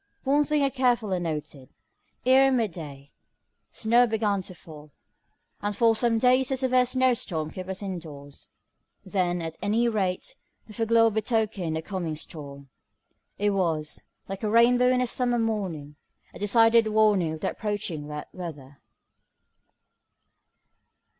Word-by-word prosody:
One 285 +2 +3
thing 300 -1 +1
I 275 - +3
carefully 240 -8 +1
noted. 150 -5 -5 0.6
Ere 265 +1 +5
mid 230 -6 +1
day, 145 -4 -10 0.6
snow 235 +2 +3
began 210 -3 0
to 185 0 -10
fall, 155 -2 -13 0.7
and 205 0 -3
for 230 0 +4
some 230 0 +1
days 255 +2 +3
a 265 - 0
severe 255 -1 +2
snow 255 0 +2
storm 160 -9 -3
kept 185 0 -8
us 190 +2 -5
indoors. 155 -7 -8 0.6
Then, 180 -3 -1
at 160 0 -7
any 220 +4 +1
rate, 210 - -2 0.3
the 215 - -13
foreglow 225 0 +3
betokened 215 -6 -1
a 160 - -5
coming 175 -5 -4
storm. 140 -3 -9 0.7
It 205 0 +1
was, 165 -6 -2 0.3
like 195 0 -6
a 215 - -1
rainbow 240 +3 +4
in 255 0 +2
a - - +2
summer 245 0 0
morning, 185 -11 -3 0.4
a - - -11
decided 225 +2 +4
warning 210 -6 +2
of 155 - -8
the - - -1
approaching 195 -8 -4
wet 150 0 -6
weather. 145 -6 -9
205 Hz, 140 wpm, -26 LUFS, 160-235 Hz, 0.7 s, Ere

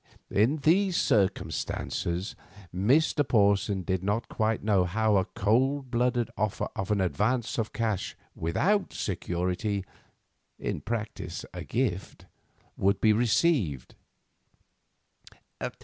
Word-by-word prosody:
In 115 +10 +3
these 180 +5 +3
circumstances, 95 - -1 0.4
Mr. 135 - +3
Porson 100 -3 +2
did 95 +1 -1
not 105 +4 -1
quite 110 -2 0
know 100 -3 +3
how 110 +4 +1
a 95 - +2
cold 125 +5 +1
blooded 120 -1 +1
offer 105 -1 -1
of 95 - -3
an 105 -1 +2
advance 110 +7 0
of 110 -1 -2
cash 110 -5 -2 0.2
without 190 - 0
security—in 90 -2 -4
practice 115 +1 -4
a - - -6
gift—would 100 -3 -3
be 110 -1 +4
received. 110 - +1
105 Hz, 100 wpm, -28 LUFS, 95-125 Hz, 0.4 s, be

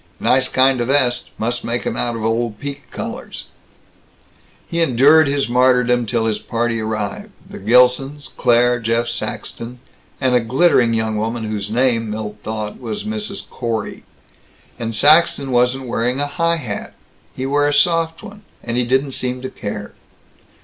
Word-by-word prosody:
"Nice 130 0 +2
kind 130 -1 +3
o' - - 0
vest. 130 -2 +2
Must 120 +2 -2
make 120 0 -3
'em - - -2
out 120 -1 -1
of 110 -1 -4
old 115 -1 -1
piqué 140 0 -5
collars." - - -6 1.2
He 170 0 -1
endured 150 +2 +5
his 140 0 0
martyrdom 125 -1 +3
till 115 +1 0
his 110 -1 0
party 115 -1 -2
arrived 110 -2 -4 0.2
the - - -9
Gilsons, 125 +6 +2
Claire, 120 +1 +3
Jeff 115 +1 0
Saxton, 120 +1 -5 0.4
and 130 -2 +1
a 125 - +5
glittering 120 -1 +3
young 110 -1 -1
woman 115 +2 -2
whose 105 -1 -4
name, 115 -1 +1
Milt 105 0 -5
thought, 110 -1 -5
was 110 -3 -4
Mrs. 215 -2 -4
Corey. 115 -4 -4 0.8
And 115 -1 -3
Saxton 145 +1 +4
wasn't 125 +2 +2
wearing 125 +2 -1
a 145 - +1
high 165 +3 0
hat! 120 -11 -6 0.4
He 130 - -4
wore 145 +2 +2
a - - +1
soft 165 +3 +2
one, 205 -1 -11 0.2
and 120 0 -3
he 125 - +2
didn't 130 +3 +1
seem 125 0 -3
to 130 - -5
care! 105 0 -6
125 Hz, 160 wpm, -19 LUFS, 115-140 Hz, 1.2 s, endured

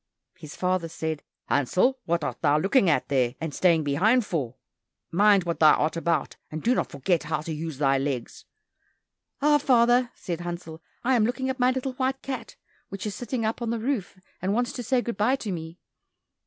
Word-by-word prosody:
His 155 -4 -11
father 180 -2 0
said, 160 -1 -4 0.2
"Hansel, 185 - +2
what 170 -1 0
art - - -4
thou 150 -1 +3
looking 195 - +3
at 145 -5 +1
there 130 -3 +1
and 160 -3 -4
staying 170 -2 +3
behind 205 - +3
for? 135 - -3 0.6
Mind 200 +1 +5
what 170 -1 -3
thou 155 -1 +7
art 155 +2 0
about, 165 -3 -1
and 155 0 -6
do 245 - +3
not - - -1
forget 160 +5 0
how 155 0 -1
to 160 +1 -5
use 155 -2 -5
thy 135 -1 +2
legs." 135 -3 -4 1.0
"Ah, 295 0 +5
father," 245 -2 +4
said 175 -2 -5
Hansel, 170 -2 -6 0.2
"I 260 +2 +2
am 230 - +3
looking 260 +2 -1
at 260 - -8
my 250 0 +4
little 260 0 -2
white 265 +1 -2
cat, 270 -1 -5 0.3
which 195 +1 -6
is 210 - -3
sitting 245 0 -3
up 220 +2 -2
on 235 - -2
the 235 - -1
roof, 225 -5 -2 0.2
and 190 +3 0
wants 245 0 0
to 245 - -5
say 245 +1 +1
good 235 -4 -4
bye 235 +6 +3
to 220 -6 -5
me." 165 -1 -6
185 Hz, 200 wpm, -26 LUFS, 160-245 Hz, 1.0 s, thou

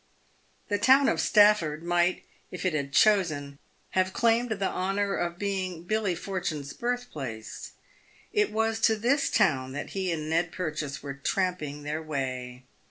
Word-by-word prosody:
The 205 -1 0
town 270 +6 +6
of - - +2
Stafford 205 -8 +4
might, 175 +1 +1 0.3
if 180 - -6
it 185 - +1
had 140 -2 -2
chosen, 145 -5 +2 0.3
have 185 0 +1
claimed 235 +1 +2
the 200 -3 -1
honour 195 +2 -1
of 175 0 -2
being 185 -4 -3
Billy 205 -1 0
Fortune's 165 -6 -4
birthplace. 155 - -5 0.6
It 420 -1 +2
was 225 +1 0
to 225 0 +4
this 250 +6 +1
town 135 -11 +2
that 145 - -5
he 190 -2 -2
and 155 -2 -3
Ned 165 +2 +1
Purchase 155 -5 -4
were 140 -1 -4
tramping 150 0 -2
their 150 +2 -3
way. 130 -4 -4
180 Hz, 150 wpm, -28 LUFS, 150-205 Hz, 0.6 s, town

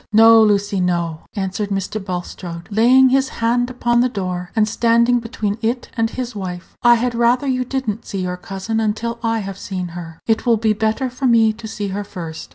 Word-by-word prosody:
"No, 225 +1 +7
Lucy, 205 -2 +2
no," 170 -3 -1
answered 200 +1 -2
Mr. 195 +1 -3
Bulstrode, 175 -2 -6
laying 250 +5 +5
his 265 +1 +2
hand 240 +2 +1
upon 240 -1 +1
the 250 - +2
door, 180 -4 -4
and 215 -1 +3
standing 235 +2 +3
between 220 -3 -3
it 240 +2 -2
and 225 -2 +1
his 250 -1 -5
wife; 180 -3 -6
"I 240 0 +6
had 240 +1 -1
rather 240 +3 +2
you 255 -2 0
did 265 0 -3
n't 215 +2 -3
see 195 -2 -3
your 180 0 -2
cousin 195 +4 -4
until 225 +2 -2
I 225 -1 0
have 195 0 -7
seen 185 -3 -4
her. 165 -1 -9
It 225 -1 +1
will 230 -1 +4
be 220 0 +2
better 220 +5 -1
for 255 +2 -1
me 225 -2 +4
to 220 +1 -9
see 210 -2 -4
her 200 +2 -3
first." 165 -5 -8
220 Hz, 205 wpm, -19 LUFS, 195-235 Hz, -, No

